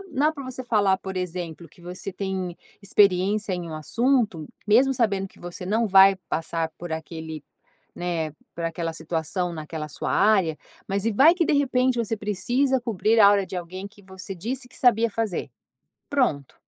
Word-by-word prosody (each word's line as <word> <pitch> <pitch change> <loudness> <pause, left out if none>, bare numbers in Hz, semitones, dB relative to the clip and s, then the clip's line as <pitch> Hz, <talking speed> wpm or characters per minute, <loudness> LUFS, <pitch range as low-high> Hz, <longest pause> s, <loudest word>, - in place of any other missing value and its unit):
não 320 - -15
dá - - -1
pra 285 -3 -8
você 255 0 -6
falar 205 -5 +3
por 190 -1 -7
exemplo, 175 -2 -5
que 170 - -21
você 180 +2 -6
tem 190 -2 -4 0.3
experiência 200 +1 +3
em 175 -2 -4
um 160 - -6
assunto, 220 - 0 0.2
mesmo 250 +6 +5
sabendo 200 -6 0
que - - -22
você 175 +1 -8
não 220 +4 +1
vai 195 0 +7
passar 165 0 -2
por 175 -1 -6
aquele, 160 -1 -6 0.5
né, 170 -3 -2 0.2
por 170 - -4
aquela 165 0 -2
situação, 165 +2 -3
naquela 155 -1 -6
sua - - -4
área, 195 -6 +3 0.3
mas 200 0 -1
e 230 - +1
vai 300 +11 +6
que 355 -1 +1
de - - +2
repente 260 -3 +2
você 225 -1 -1
precisa 245 +6 0
cobrir 225 -1 +1
a 200 -1 +9
hora 200 -1 +2
de - - -8
alguém 185 +3 -6
que 205 0 -16
você 190 0 -8
disse 245 +9 -4
que - - -11
sabia 230 -2 +4
fazer, 215 -3 -2 0.6
pronto. 200 - 0
195 Hz, 180 wpm, -25 LUFS, 170-230 Hz, 0.6 s, a